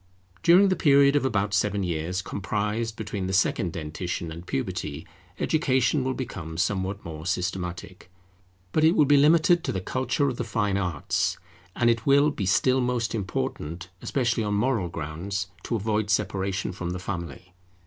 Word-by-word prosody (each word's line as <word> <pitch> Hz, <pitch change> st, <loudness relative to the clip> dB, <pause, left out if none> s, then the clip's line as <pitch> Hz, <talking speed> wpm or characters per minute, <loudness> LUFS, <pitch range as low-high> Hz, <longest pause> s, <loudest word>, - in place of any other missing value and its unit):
During 180 Hz, +4 st, +6 dB
the 185 Hz, -, +2 dB
period 140 Hz, -3 st, +5 dB
of 145 Hz, -, +2 dB
about 105 Hz, -5 st, 0 dB
seven 100 Hz, 0 st, +1 dB
years 90 Hz, +2 st, -2 dB
comprised 105 Hz, +3 st, -2 dB
between 100 Hz, -3 st, -4 dB
the 95 Hz, -, -3 dB
second 95 Hz, -1 st, +1 dB
dentition 80 Hz, +1 st, -4 dB
and 85 Hz, +3 st, -9 dB
puberty, 70 Hz, +3 st, -3 dB, 0.3 s
Education 135 Hz, -3 st, +1 dB
will 130 Hz, 0 st, -1 dB
become 80 Hz, -10 st, -6 dB
somewhat 95 Hz, +3 st, -1 dB
more 80 Hz, 0 st, -7 dB
systematic; 90 Hz, -1 st, -4 dB, 0.6 s
but 155 Hz, -, +2 dB
it 160 Hz, +4 st, +5 dB
will 150 Hz, -, +5 dB
be 145 Hz, +1 st, +5 dB
limited 160 Hz, +4 st, +5 dB
to -, -, -1 dB
the 95 Hz, -, -2 dB
culture 130 Hz, -, 0 dB
of 130 Hz, -3 st, -2 dB
the -, -, -2 dB
fine 105 Hz, -3 st, 0 dB
arts; 90 Hz, 0 st, -1 dB, 0.4 s
and 120 Hz, -, +2 dB
it 115 Hz, +1 st, +1 dB
will 140 Hz, +2 st, +5 dB
be 100 Hz, -9 st, -3 dB
still 130 Hz, +6 st, +3 dB
most 120 Hz, -2 st, -1 dB
important, 95 Hz, -, -4 dB
especially 120 Hz, -4 st, 0 dB
on 105 Hz, -1 st, -1 dB
moral 105 Hz, -4 st, +1 dB
grounds, 85 Hz, +5 st, -4 dB, 0.2 s
to 120 Hz, -, -1 dB
avoid 105 Hz, -1 st, -1 dB
separation 95 Hz, -2 st, 0 dB
from 90 Hz, -1 st, -4 dB
the -, -, -4 dB
family. 90 Hz, -1 st, -6 dB
100 Hz, 165 wpm, -26 LUFS, 90-130 Hz, 0.6 s, During